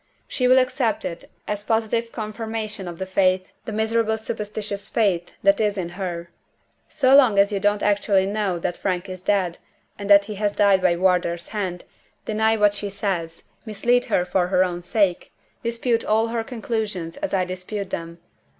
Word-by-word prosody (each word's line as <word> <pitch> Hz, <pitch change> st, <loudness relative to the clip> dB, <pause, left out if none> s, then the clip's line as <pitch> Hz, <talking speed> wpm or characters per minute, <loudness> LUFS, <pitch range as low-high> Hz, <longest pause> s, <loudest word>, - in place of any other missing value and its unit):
She 250 Hz, -, 0 dB
will 255 Hz, +1 st, +6 dB
accept 255 Hz, -2 st, +1 dB
it 170 Hz, 0 st, -5 dB, 0.2 s
as 205 Hz, -1 st, -3 dB
positive 230 Hz, +1 st, 0 dB
confirmation 215 Hz, -2 st, -4 dB
of 170 Hz, -1 st, -7 dB
the 190 Hz, -, -4 dB
faith, 185 Hz, -1 st, +1 dB
the -, -, -5 dB
miserable 220 Hz, +1 st, +1 dB
superstitious 210 Hz, -2 st, -5 dB
faith, 185 Hz, -6 st, 0 dB
that 200 Hz, +2 st, +4 dB
is 210 Hz, -1 st, +1 dB
in 175 Hz, -3 st, -3 dB
her. 175 Hz, -2 st, -5 dB, 0.6 s
So 270 Hz, -2 st, +4 dB
long 255 Hz, -8 st, +6 dB
as 200 Hz, +1 st, +5 dB
you 200 Hz, -, -1 dB
don't 205 Hz, +1 st, +1 dB
actually 200 Hz, -2 st, +2 dB
know 200 Hz, -2 st, -1 dB
that 175 Hz, +1 st, -2 dB
Frank 185 Hz, -1 st, -2 dB
is 185 Hz, -1 st, -7 dB
dead, 185 Hz, -3 st, 0 dB, 0.4 s
and 200 Hz, 0 st, -5 dB
that 200 Hz, 0 st, +7 dB
he 210 Hz, -, -6 dB
has 205 Hz, -1 st, +1 dB
died 200 Hz, -2 st, +4 dB
by 180 Hz, -2 st, +3 dB
Wardour's 175 Hz, -1 st, +1 dB
hand, 185 Hz, -4 st, -3 dB, 0.4 s
deny 220 Hz, +1 st, +2 dB
what 205 Hz, -1 st, +4 dB
she 205 Hz, 0 st, -3 dB
says 175 Hz, -5 st, -3 dB, 0.2 s
mislead 240 Hz, +3 st, +1 dB
her 180 Hz, -, +1 dB
for 180 Hz, 0 st, +1 dB
her 185 Hz, 0 st, +3 dB
own 175 Hz, -1 st, -3 dB
sake 185 Hz, 0 st, 0 dB, 0.3 s
dispute 235 Hz, 0 st, 0 dB
all 220 Hz, +1 st, +2 dB
her 230 Hz, -1 st, -2 dB
conclusions 220 Hz, -8 st, -4 dB
as 295 Hz, 0 st, -3 dB
I 185 Hz, -2 st, +1 dB
dispute 185 Hz, +2 st, -5 dB
them. 170 Hz, 0 st, -5 dB
205 Hz, 175 wpm, -23 LUFS, 185-220 Hz, 0.6 s, that